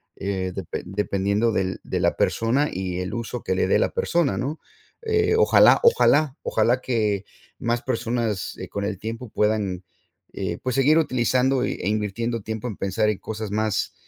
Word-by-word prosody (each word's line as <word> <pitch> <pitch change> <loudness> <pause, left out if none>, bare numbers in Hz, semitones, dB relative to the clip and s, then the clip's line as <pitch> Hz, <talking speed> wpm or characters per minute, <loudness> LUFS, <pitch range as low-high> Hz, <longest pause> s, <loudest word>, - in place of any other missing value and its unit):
eh, 95 -2 -3
depe 95 -3 -5
dependiendo 100 +3 0
del 95 -3 -1
de - - -2
la - - +2
persona 130 +6 +1
y 90 -1 -3
el 90 - -4
uso 120 0 -4
que 95 - -1
le 95 - +1
dé - - +3
la - - +2
persona, 155 - 0
¿no? 140 +7 -3 0.4
Eh, 440 -1 +2
ojalá, 455 - +6
ojalá, 155 - +4
ojalá 120 +4 +2
que 105 -6 0 0.4
más 120 0 0
personas, 115 -5 -2
eh, - - -6
con 100 - -4
el 100 -1 -2
tiempo 115 +3 -6
puedan, 105 -4 0 0.5
eh, - - -3
pues 130 -2 -1
seguir 145 +4 +4
utilizando 130 -2 +2
y - - -1
e 95 - -5
invirtiendo 110 +2 -1
tiempo 110 +3 -5
en 110 - -6
pensar 100 +2 0
en 105 - -2
cosas 110 -1 -5
más, 110 -1 -1
110 Hz, 175 wpm, -24 LUFS, 100-125 Hz, 0.5 s, ojalá